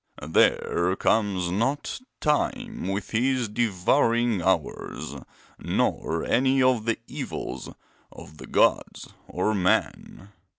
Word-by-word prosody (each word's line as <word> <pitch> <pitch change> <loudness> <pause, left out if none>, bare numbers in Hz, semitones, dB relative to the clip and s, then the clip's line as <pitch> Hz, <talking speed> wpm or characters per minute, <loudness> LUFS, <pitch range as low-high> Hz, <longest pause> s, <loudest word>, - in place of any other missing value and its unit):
'There 85 +2 +2
comes 95 -5 +1
not 135 - -1 0.2
Time 150 - -1
with 95 +2 -3
his 125 +1 +1
devouring 115 +1 +1
hours; - - -2 0.5
nor 80 +1 -1
any 135 +1 +2
of 125 -4 +2
the 115 -1 0
evils 65 - -6 0.4
of 75 - -13
the - - -9
gods - - +1 0.2
or 95 +4 -1
men. 95 0 -1
110 Hz, 100 wpm, -25 LUFS, 90-125 Hz, 0.5 s, There